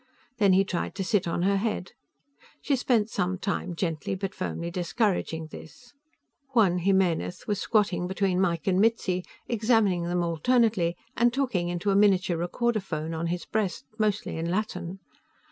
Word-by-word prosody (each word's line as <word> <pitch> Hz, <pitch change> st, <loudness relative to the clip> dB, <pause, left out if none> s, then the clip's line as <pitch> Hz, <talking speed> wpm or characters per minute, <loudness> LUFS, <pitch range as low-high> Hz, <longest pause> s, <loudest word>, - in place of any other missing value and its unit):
Then 200 Hz, -3 st, +5 dB
he 190 Hz, +1 st, +5 dB
tried 180 Hz, -2 st, -3 dB
to 195 Hz, -, -2 dB
sit 190 Hz, -1 st, +1 dB
on 170 Hz, +1 st, -1 dB
her 200 Hz, +1 st, +3 dB
head. 210 Hz, -3 st, -2 dB, 0.7 s
She 285 Hz, -, +1 dB
spent 235 Hz, -4 st, +1 dB
some 185 Hz, 0 st, -1 dB
time 185 Hz, -2 st, -3 dB
gently 165 Hz, 0 st, -2 dB
but 190 Hz, 0 st, -4 dB
firmly 170 Hz, -2 st, -4 dB
discouraging 175 Hz, -3 st, -1 dB
this. 245 Hz, +9 st, -12 dB, 0.6 s
Juan 190 Hz, -6 st, +4 dB
Jimenez 180 Hz, -1 st, +1 dB
was 205 Hz, -2 st, -1 dB
squatting 205 Hz, -5 st, +1 dB
between 190 Hz, -1 st, 0 dB
Mike 170 Hz, -3 st, 0 dB
and 190 Hz, 0 st, +3 dB
Mitzi, 205 Hz, -5 st, +1 dB, 0.2 s
examining 215 Hz, -6 st, +2 dB
them 175 Hz, 0 st, 0 dB
alternately 175 Hz, +1 st, +2 dB, 0.2 s
and 240 Hz, 0 st, +3 dB
talking 235 Hz, -10 st, 0 dB
into 175 Hz, +3 st, -1 dB
a -, -, +2 dB
miniature 190 Hz, -4 st, +3 dB
recorder 220 Hz, +7 st, 0 dB
phone 160 Hz, -4 st, -4 dB
on 165 Hz, +1 st, -2 dB
his 175 Hz, +1 st, -3 dB
breast, 210 Hz, -4 st, -2 dB
mostly 210 Hz, -5 st, 0 dB
in 165 Hz, +1 st, -2 dB
Latin. 185 Hz, -2 st, -2 dB
190 Hz, 160 wpm, -27 LUFS, 175-210 Hz, 0.7 s, Then